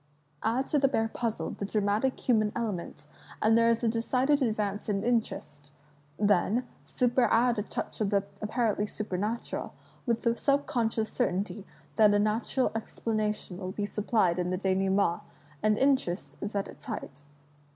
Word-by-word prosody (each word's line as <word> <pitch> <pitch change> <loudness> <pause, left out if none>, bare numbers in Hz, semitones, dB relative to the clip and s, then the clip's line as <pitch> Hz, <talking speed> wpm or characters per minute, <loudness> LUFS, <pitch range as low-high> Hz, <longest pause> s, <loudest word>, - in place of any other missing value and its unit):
Add 245 +4 0
to 295 - +3
the 275 - +4
bare 225 -4 0
puzzle 230 -2 -2
the - - -6
dramatic 210 +5 0
human 215 -4 +3
element, 190 -10 -4 0.3
and 220 +1 +4
there 230 0 +5
is 230 +1 +1
a - - +3
decided 255 +5 +2
advance 210 -4 -1
in 200 -1 0
interest; 215 -11 -2 0.5
then 210 +4 +2 0.2
superadd 245 -1 +3
a - - +1
touch 210 - -5
of 205 - +2
the 200 -1 +2 0.2
apparently 210 -1 0
supernatural, 210 +2 -3 0.3
with 235 -1 +1
the 235 -1 +2
subconscious 235 -6 0
certainty 195 +2 -1 0.3
that 210 -2 +6
a - - +5
natural 215 +5 +1
explanation 215 -4 -2
will 185 -1 -5
be 205 - -2
supplied 205 -4 +1
in 180 0 0
the 185 - 0
denoue 190 0 +1
ment, 190 -3 +2 0.4
and 215 0 +3
interest 260 -9 +1
is 205 +1 -4
at 200 - 0
its - - -13
height. 175 - -6
215 Hz, 155 wpm, -29 LUFS, 200-235 Hz, 0.5 s, that